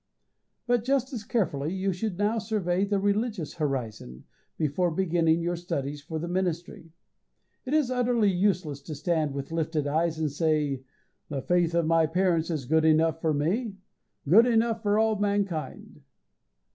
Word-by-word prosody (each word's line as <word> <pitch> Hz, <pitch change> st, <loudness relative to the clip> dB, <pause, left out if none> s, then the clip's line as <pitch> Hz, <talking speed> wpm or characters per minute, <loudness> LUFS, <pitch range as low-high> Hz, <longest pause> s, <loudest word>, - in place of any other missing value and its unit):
But 245 Hz, -2 st, +1 dB
just 265 Hz, +1 st, 0 dB
as 225 Hz, -4 st, -4 dB
carefully 165 Hz, -, -1 dB
you 190 Hz, 0 st, -1 dB
should 185 Hz, 0 st, -3 dB
now 210 Hz, +3 st, +1 dB
survey 200 Hz, -4 st, 0 dB
the 200 Hz, 0 st, 0 dB
religious 205 Hz, -, -1 dB
horizon, 115 Hz, -, -4 dB, 0.3 s
before 160 Hz, +3 st, +1 dB
beginning 165 Hz, -1 st, +1 dB
your 175 Hz, +1 st, -1 dB
studies 145 Hz, -4 st, -4 dB
for 160 Hz, +2 st, -6 dB
the 165 Hz, +2 st, -4 dB
ministry. 175 Hz, -2 st, -3 dB, 0.8 s
It 285 Hz, -, +1 dB
is 290 Hz, -5 st, +2 dB
utterly 240 Hz, -4 st, +2 dB
useless 180 Hz, -6 st, 0 dB
to 150 Hz, +2 st, -7 dB
stand 155 Hz, -1 st, -1 dB
with 140 Hz, +2 st, -5 dB
lifted 160 Hz, -2 st, -1 dB
eyes 160 Hz, +2 st, 0 dB
and 155 Hz, -2 st, -1 dB
say, 150 Hz, -3 st, 0 dB, 0.5 s
"The 140 Hz, -3 st, -4 dB
faith 175 Hz, -1 st, +1 dB
of 170 Hz, -1 st, +2 dB
my 165 Hz, 0 st, +3 dB
parents 170 Hz, -1 st, +1 dB
is 155 Hz, -6 st, -2 dB
good 160 Hz, +4 st, +2 dB
enough 160 Hz, +1 st, +3 dB
for 160 Hz, -, +1 dB
me 195 Hz, -, -1 dB, 0.5 s
good 220 Hz, -, +7 dB
enough 225 Hz, -1 st, +2 dB
for 205 Hz, -1 st, +1 dB
all 220 Hz, -1 st, +2 dB
mankind." 195 Hz, -9 st, -2 dB
170 Hz, 160 wpm, -27 LUFS, 155-205 Hz, 0.8 s, good